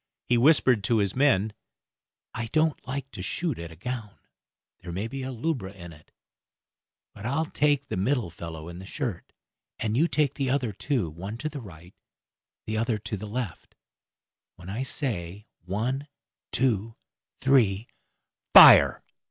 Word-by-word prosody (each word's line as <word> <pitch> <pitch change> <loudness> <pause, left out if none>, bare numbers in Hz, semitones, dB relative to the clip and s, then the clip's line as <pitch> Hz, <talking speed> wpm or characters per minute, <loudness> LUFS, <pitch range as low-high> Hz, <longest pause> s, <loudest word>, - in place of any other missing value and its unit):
He 120 - +2
whispered 125 -4 +4
to 115 +1 +2
his 100 -3 0
men, 110 -7 +3 0.8
"I 115 +1 -4
don't 155 +4 0
like 135 +1 -5
to - - -7
shoot 150 - -3
at 85 0 -7
a - - -11
gown; 110 +2 -6 0.6
there 85 - -8
may 95 +6 -3
be 135 +3 -6
a 130 0 -4
lubra 125 -6 -3
in 85 -3 -10
it, 75 0 -19 1.0
but 105 - -12
I'll 150 +5 0
take 145 -2 +1
the 135 - -3
middle 115 -2 0
fellow 80 -1 -8
in 85 +1 -8
the 95 - -10
shirt, 120 - -5 0.5
and 110 -1 -2
you 155 +7 +3
take 150 -4 +1
the 135 -3 -2
other 125 -5 0
two, 120 - -1
one 95 +8 -7
to 155 +6 -3
the 145 -3 -7
right, 90 -3 -13 0.7
the 110 0 -2
other 115 0 0
to 105 +1 -5
the 105 +2 -7
left; 115 -3 -5 0.8
when 90 - -11
I 115 +6 -3
say 105 - -4 0.2
one, 125 +10 -2 0.4
two, 115 -3 0 0.4
three, 115 -6 +3 0.7
fire." - - +9
115 Hz, 160 wpm, -26 LUFS, 95-135 Hz, 1.0 s, fire